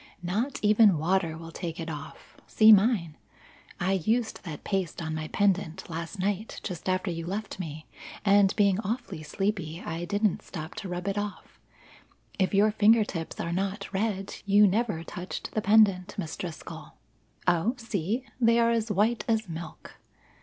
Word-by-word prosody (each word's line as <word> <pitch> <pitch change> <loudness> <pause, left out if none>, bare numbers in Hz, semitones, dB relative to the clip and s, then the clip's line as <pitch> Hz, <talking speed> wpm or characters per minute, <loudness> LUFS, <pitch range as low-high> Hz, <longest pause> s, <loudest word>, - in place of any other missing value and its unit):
Not 215 +10 -1
even 210 -3 +6
water 165 0 0
will 165 0 -9
take 170 -1 -5
it 165 - -4
off, 150 -2 -8
see 220 0 +6
mine. 200 -7 +4 0.6
I 180 +2 +1
used 220 +6 0
that 160 -6 -7
paste 190 -4 -2
on 160 -2 -3
my 155 0 -3
pendant 190 -3 0
last 165 +4 -5
night 200 +3 -2
just 180 0 -4
after 185 0 0
you 165 0 -5
left 200 +1 -4
me, 155 -3 -6 0.4
and 200 -1 +5
being 200 -2 +3
awfully 220 -5 -4
sleepy 170 0 -2
I 170 -1 -4
didn't 205 +2 0
stop 160 -2 -7
to 195 - -5
rub 180 +1 -4
it 200 +1 0
off. 205 0 -7 0.8
If 190 - +2
your 205 +2 +4
finger 220 +1 +5
tips 165 -5 -6
are 170 0 -2
not 195 +3 -3
red, 195 -1 -1
you 205 +1 +6
never 205 -4 0
touched 180 +2 -6
the 215 - -1
pendant, 205 -2 +4
Miss 165 -5 -4
Driscoll. 170 -4 -8 0.5
Oh, 180 +8 +2
see! 225 0 -2 0.2
They 230 -1 +4
are 235 0 +4
as 230 -1 0
white 210 +4 +1
as 220 -2 +1
milk. 165 0 -8
195 Hz, 165 wpm, -28 LUFS, 170-210 Hz, 0.8 s, even